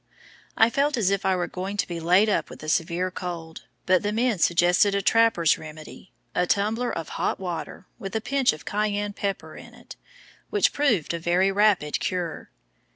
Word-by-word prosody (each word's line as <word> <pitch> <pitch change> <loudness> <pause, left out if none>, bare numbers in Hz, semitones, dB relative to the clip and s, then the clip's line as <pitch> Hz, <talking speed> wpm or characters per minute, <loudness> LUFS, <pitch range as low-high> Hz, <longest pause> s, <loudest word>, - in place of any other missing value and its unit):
I 225 +1 +5
felt 280 +2 +1
as 200 -4 +2
if 200 -1 0
I 190 - +3
were 175 -1 -1
going 190 +3 -5
to - - 0
be 170 -1 -5
laid 180 +6 +4
up 210 - 0
with - - -11
a 155 - -4
severe 170 +3 0
cold, 170 -3 -7 0.2
but 185 -1 +3
the 205 - -1
men 225 -2 0
suggested 175 +4 +3
a 200 - +1
trapper's 225 -8 +3
remedy 155 +3 -11 0.2
a 180 - +1
tumbler 220 +5 0
of 165 -1 -5
hot - - -2
water, 180 0 -6
with 195 +1 -6
a - - +2
pinch 270 +3 +1
of 155 -3 -10
cayenne 205 0 -1
pepper 200 -1 -4
in - - -12
it - - -13 0.5
which 415 -2 +2
proved 235 - +1
a 170 - -3
very 175 +3 +2
rapid 195 -7 +2
cure. 175 -3 -3
190 Hz, 190 wpm, -25 LUFS, 175-210 Hz, 0.5 s, I